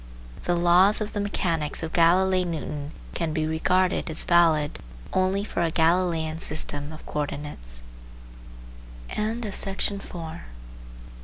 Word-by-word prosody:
The 175 - +2
laws 175 +4 +5
of 215 -1 -4
the 205 - -2
mechanics 165 -7 -1
of 160 - -4
Galflei 185 +2 +4
Newton 150 -4 -4 0.2
can 165 -3 -2
be 155 -1 0
regarded 180 +4 +1
as 160 - +3
valid 165 -4 +3 0.3
only 190 +2 +2
for 190 - -3
a 170 - +2
Galileian 165 -1 +1
system 145 -1 -3
of 155 - -11
co 150 - -3
ordinates. - - -5
165 Hz, 110 wpm, -25 LUFS, 155-185 Hz, 0.3 s, laws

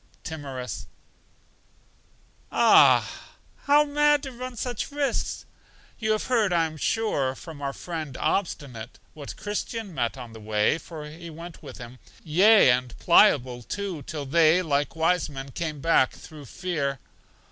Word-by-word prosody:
Timorous: 135 -6 -6 1.6
Ah, - - +6 0.6
how 290 +1 +6
mad 295 0 +2
to 270 - -6
run 250 0 -7
such 245 0 -3
risks! 285 -1 -2 0.5
You 220 -2 +1
have 215 - -1
heard, 225 -6 +1
I 170 -2 +3
am 155 -1 -6
sure, 145 -6 0
from 155 0 -10
our 140 -1 -2
friend 155 -3 -6
Obstinate, 135 - -3 0.2
what 145 -3 -9
Christian 210 -1 -4
met 120 -5 -1
with - - -15
on 115 -2 -9
the 110 - -10
way, 105 +7 +1
for 155 -1 -9
he 165 +3 -10
went 165 +2 -10
with - - -10
him; 125 0 -10 0.2
yea, 190 - +6
and 125 -1 -1
Pliable, 130 - +4
too, 190 - -5
till 145 +1 -6
they, 165 +4 +4
like 145 -2 -1
wise 165 +1 +1
men, 135 -1 -8
came 155 -1 -4
back 165 -5 +3
through 150 -3 -12
fear. 150 -4 -3
160 Hz, 145 wpm, -26 LUFS, 135-200 Hz, 1.6 s, Ah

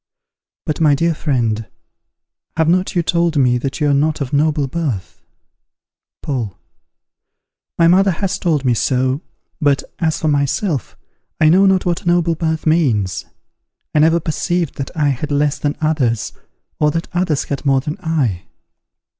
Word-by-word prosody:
_ - - -73 0.6
But, 155 -1 -2
my 150 -3 +5
dear 165 +3 +1
friend, 115 -8 -1 0.9
have 160 -1 +2
not 185 +3 +1
you 175 - +2
told 170 -1 +1
me 125 -3 +3
that 135 +4 -4
you 150 - +1
are - - +3
not 150 +2 +1
of 140 -2 -4
noble 150 0 +2
birth? 135 - -4 1.0
Paul. 120 - -3 1.2
My 170 - +5
mother 190 +3 +5
has 195 +2 -2
told 155 -6 0
me 125 - +3
so; 130 +4 0 0.4
but, 145 -2 +2 0.2
as 160 -3 0
for 155 - -1
myself, 145 +2 -1 0.4
I 155 - +5
know 190 +4 +5
not 190 -1 +2
what 175 0 -1
noble 175 -1 +3
birth 160 -1 -2
means. 130 - +1 0.7
I 150 - +3
never 165 +2 +4
perceived 170 +1 -1
that 135 - -3
I 150 -2 +2
had 140 +3 -3
less 145 0 +1
than 145 0 -2
others, 135 -8 0 0.5
or 150 - +3
that 165 +3 -3
others 175 -5 0
had 140 - -4
more 135 -2 +2
than 150 +3 -5
I. 135 - -1
150 Hz, 160 wpm, -18 LUFS, 135-165 Hz, 1.2 s, my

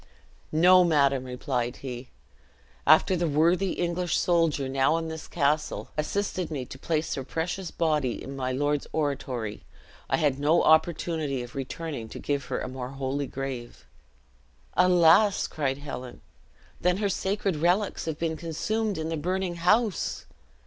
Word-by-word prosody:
"No, 180 +3 +6
madam," 140 -5 +2
replied 125 -1 -2
he; 125 -1 -6 0.8
"after 155 +5 +6
the 170 -1 0
worthy 170 +6 +2
English 175 -1 -1
soldier 165 -6 +2
now 135 +4 +2
in 165 -1 -3
this 160 0 -7
castle, 150 -1 0
assisted 185 +3 -2
me 140 -5 -4
to 130 - -11
place 160 +1 -1
her 135 - -3
precious 170 +6 -3
body 150 -7 0
in 135 - -7
my 130 -1 -2
lord's 145 +2 0
oratory, 130 -8 -2 0.5
I - - +2
had 145 -4 +1
no 155 +4 +3
opportunity 160 -4 +2
of 120 - -10
returning 135 -3 -5
to - - -8
give 140 -2 -2
her - - -3
a - - -3
more 130 -1 -6
holy 135 +1 -3
grave." 130 -3 -6 0.9
"Alas!" 180 +3 +5
cried 135 -3 -2
Helen; 130 -3 -8 0.6
"then 180 0 +2
her 205 0 0
sacred 195 -2 -1
relics 180 +6 +1
have 160 -2 -3
been 160 -1 -2
consumed 205 +6 -2
in 160 0 -3
the 165 - -2
burning 180 +2 -2
house!" 205 +4 +1
155 Hz, 150 wpm, -27 LUFS, 135-175 Hz, 0.9 s, No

